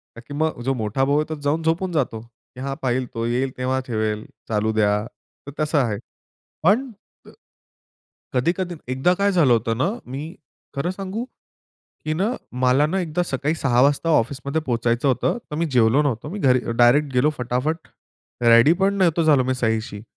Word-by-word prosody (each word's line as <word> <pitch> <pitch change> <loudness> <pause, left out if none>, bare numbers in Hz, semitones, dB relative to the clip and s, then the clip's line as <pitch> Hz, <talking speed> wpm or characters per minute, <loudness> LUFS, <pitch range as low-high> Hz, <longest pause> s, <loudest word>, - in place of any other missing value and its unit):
का 115 - -10
की 135 +4 -11
मग 160 -6 -1
जो 135 +2 +1
मोठा 110 +5 0
भाऊ 140 +1 +1
आहे 150 - +1
तो 155 - -5
जाऊन 150 +3 +1
झोपून 165 +3 0
जातो. 135 -8 -1 0.4
की 125 - -11
हा 135 0 -3
पाहिल, 130 0 0
तो 115 0 -2
येईल 125 +3 0
तेव्हा 130 +1 0
ठेवेल. 110 -1 -1 0.2
चालू 110 0 +1
द्या 105 -1 +3 0.6
तर 145 - -6
तसं 150 0 +1
आहे. 115 -6 0 0.7
पण 235 +9 +3 1.4
कधी-कधी 175 +7 0 0.2
एकदा 135 +8 +2
काय 200 0 +3
झालं 160 -9 +4
होतं 115 -1 +1
ना, 170 +10 +1 0.2
मी 145 +7 -6 0.4
खरं 170 +6 -1
सांगू, 195 +4 -4 0.8
की 155 - 0
ना 190 +8 0 0.3
मला 130 +3 +4
ना 190 +4 -1
एकदा 175 +1 -1
सकाळी 145 +1 -1
6:00 125 -5 +2
वाजता 145 +4 +2
ऑफिसमध्ये 140 +2 0
पोहोचायचं 120 -1 0
होतं 135 - +1
तर - - -3
मी 165 +2 0
जेवलो 120 +4 +4
नव्हतो. 140 0 -2
मी 205 - -5
घरी 130 -6 +4 0.2
डायरेक्ट 135 +4 +4
गेलो 125 +4 +3
फटाफट 125 +7 -2 0.5
रेडी 115 +6 +6
पण 200 +1 +3
नव्हतो 170 -3 +2
झालो 145 -5 +4
मी 130 - 0
सहीशी. 110 -3 -2
135 Hz, 175 wpm, -22 LUFS, 120-160 Hz, 1.4 s, रेडी